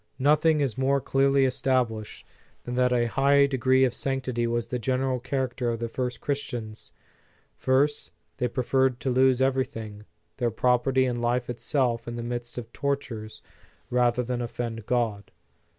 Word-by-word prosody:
Nothing 150 +3 +3
is 130 -3 -1
more 135 +1 +2
clearly 135 0 +2
established, 125 -4 -1 0.4
than 125 - -5
that 125 0 +2
a 120 -1 +2
high 140 +4 +4
degree 130 -1 +2
of 125 -2 +2
sanctity 130 -3 -2
was 115 0 -2
the 125 - -2
general 130 +1 0
character 130 -1 -2
of 115 - -1
the 115 0 -4
early 125 -1 -1
Christians. 120 - -5 0.6
First, 135 - +1 0.3
they 125 - 0
preferred 130 +1 +1
to 130 - 0
lose 130 0 +4
everything, 115 -6 -2 0.3
their 120 -2 +1
property 125 +3 +2
and 120 -2 -2
life 120 +1 0
itself 120 -1 -1
in 120 - -4
the 120 - -4
midst 120 0 -5
of 120 -1 -7
tortures, 130 -6 -4 0.5
rather 125 0 +2
than 125 0 -3
offend 115 -2 -5
God. 115 -5 -1
125 Hz, 150 wpm, -26 LUFS, 120-135 Hz, 0.6 s, high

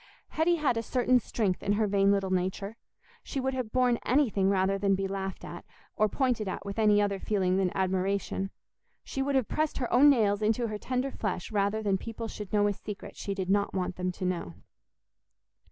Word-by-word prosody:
Hetty 325 +2 +2
had 290 -7 +1
a - - +1
certain 250 +1 +2
strength 210 -5 -1
in 205 - +1
her 215 +1 +2
vain 200 -1 +3
little 195 -1 0
nature: 190 +3 -1 0.5
she 275 - -4
would 265 0 -1
have 250 -4 -3
borne 250 -2 +3
anything 225 -8 +2
rather 195 0 +1
than 195 -1 +2
be 195 0 -2
laughed 190 0 -5
at, - - -8 0.3
or 215 - +2
pointed 245 -4 0
at 190 - -4
with 200 +2 -4
any 210 -1 +5
other 200 -1 0
feeling 190 -3 +1
than 190 -2 +1
admiration; 190 +1 -1 0.5
she 270 - -4
would 275 +1 0
have 260 -4 +2
pressed 310 0 -1
her 245 - -2
own 275 +4 +7
nails 215 -6 +3
into 225 +2 +1
her 210 -1 -4
tender 255 +3 -2
flesh 190 -6 -4
rather 205 +1 0
than 195 -2 +1
people 230 +1 -6
should 210 -3 -8
know 205 -1 +3
a 205 - +2
secret 210 +1 -8
she 200 - -4
did 190 -1 -2
not 200 0 +1
want 185 -1 -2
them 180 0 -2
to 185 - -5
know. 170 - -3
205 Hz, 205 wpm, -29 LUFS, 195-240 Hz, 0.5 s, own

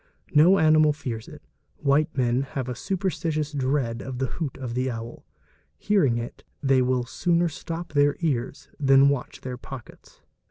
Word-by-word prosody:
No 165 +6 +6
animal 155 -2 +5
fears 120 -7 -6
it, - - -12 0.3
white 145 +1 +1
men 125 0 +2
have 130 -1 -4
a 125 - -2
superstitious 160 -1 -2
dread 130 -4 -1
of 130 -2 -6
the 135 - 0
hoot 145 +2 -4
of 130 -3 -5
the 130 +2 0
owl; 115 -1 -7 0.5
hearing 155 - +2
it 120 0 -6 0.2
they 135 -2 +3
will 125 0 +1
sooner 175 +6 +1
stop 165 +2 -6
their 145 0 +3
ears 135 -5 -2
than 135 -1 +6
watch 140 -3 -3
their 125 -1 -5
pockets. 130 -2 -11
140 Hz, 160 wpm, -25 LUFS, 125-155 Hz, 0.5 s, No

